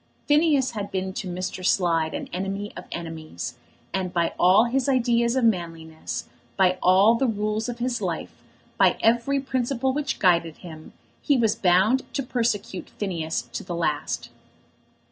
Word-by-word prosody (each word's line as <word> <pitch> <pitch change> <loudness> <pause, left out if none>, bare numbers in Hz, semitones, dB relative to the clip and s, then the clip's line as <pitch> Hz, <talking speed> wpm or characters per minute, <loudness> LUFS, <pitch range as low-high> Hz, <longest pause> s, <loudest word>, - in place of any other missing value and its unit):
Phineas 295 -3 +3
had 205 -3 -5
been 190 0 -3
to 190 - -5
Mr. 185 +1 -4
Slide 165 -4 +1
an - - -5
enemy 195 +3 -3
of 180 - -8
enemies, 160 - -6 0.3
and 185 -2 -1
by 170 -2 0
all 185 +5 +6
his 255 +3 0
ideas 235 -2 +2
of 260 - +1
manliness, 165 -6 -2 0.3
by 185 -1 +3
all 190 +5 +6
the 255 +3 +1
rules 215 +1 -1
of 240 - -5
his 240 0 -2
life, - - -4 0.4
by - - +5
every 240 +5 +3
principle 260 0 -1
which 285 -1 -2
guided 170 -4 +2
him, 160 -3 -11 0.3
he 285 -3 +2
was 225 -3 +2
bound 195 +8 +2
to 275 - 0
persecute 230 -7 -2
Phineas 165 - -2
to - - -4
the 175 -2 -5
last. 150 -3 -2
200 Hz, 155 wpm, -25 LUFS, 175-240 Hz, 0.4 s, all